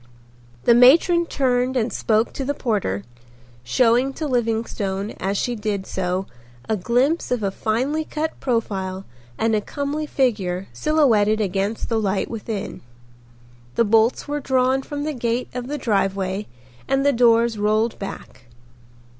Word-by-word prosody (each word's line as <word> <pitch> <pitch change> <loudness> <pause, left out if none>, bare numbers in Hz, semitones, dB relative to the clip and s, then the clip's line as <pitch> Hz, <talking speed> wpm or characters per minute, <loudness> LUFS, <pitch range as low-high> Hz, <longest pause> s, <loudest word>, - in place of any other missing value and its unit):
The 235 - +6
matron 330 +8 +6
turned 255 -2 +1
and 235 0 0
spoke 220 +1 +1
to 275 - -4
the 285 +2 -2
porter, 200 - -1 0.6
showing 245 - +2
to 310 - -4
Livingstone, 225 -5 -1
as 195 +2 -1
she 245 - -1
did 210 -3 -3
so, 185 0 -2 0.4
a 220 - +1
glimpse 245 - +1
of 245 -3 -1
a 195 - 0
finely 255 +10 -1
cut 310 +1 -4
profile 195 -6 -2 0.3
and 225 0 +1
a 210 - +1
comely 290 +5 -3
figure 195 -10 0
silhouetted 230 -9 +3
against 200 +2 -1
the 225 -1 0
light 200 -2 -1
within. 215 -2 -5 0.9
The 230 - +3
bolts 225 +5 +2
were 295 0 -2
drawn 260 -1 +1
from 290 +1 -5
the 305 0 -2
gate 240 -1 -2
of 250 0 -5
the 295 +2 -3
driveway 195 -4 -1 0.4
and 270 +1 +1
the 285 - +4
doors 230 -2 +3
rolled 215 +2 +1
back. 195 -9 -8
230 Hz, 145 wpm, -22 LUFS, 205-265 Hz, 0.9 s, The